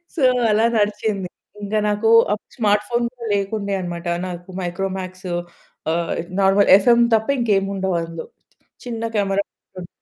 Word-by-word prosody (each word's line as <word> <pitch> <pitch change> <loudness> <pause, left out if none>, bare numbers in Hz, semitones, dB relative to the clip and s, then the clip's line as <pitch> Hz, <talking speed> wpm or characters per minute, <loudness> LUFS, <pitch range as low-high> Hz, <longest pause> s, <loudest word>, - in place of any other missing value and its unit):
So, 290 - -1 0.3
అలా 220 +2 +3
నడిచింది. 205 -2 -1 0.3
ఇంకా 215 +1 0
నాకు 210 +2 +1 0.5
స్మార్ట్ 210 -3 +2
ఫోన్ 240 0 +1
కూడా 240 -2 -9
లేకుండే 200 0 -2
అన్నమాట. 175 -1 -5 0.2
నాకు 175 0 -8
మైక్రోమ్యాక్స్ 185 +1 -4 0.7
ఆహ్, 170 0 -1 0.3
నార్మల్, 195 +1 +4
ఎఫ్‌ఎమ్ 235 +4 +4
తప్ప, 220 0 0
ఇంకేముండవు 195 -4 0
అందులో. 165 0 -7 0.6
చిన్న 230 -2 -4
కెమెరా 200 0 +1 0.4
ఉంటది. 175 - -9
200 Hz, 125 wpm, -21 LUFS, 185-215 Hz, 0.7 s, నార్మల్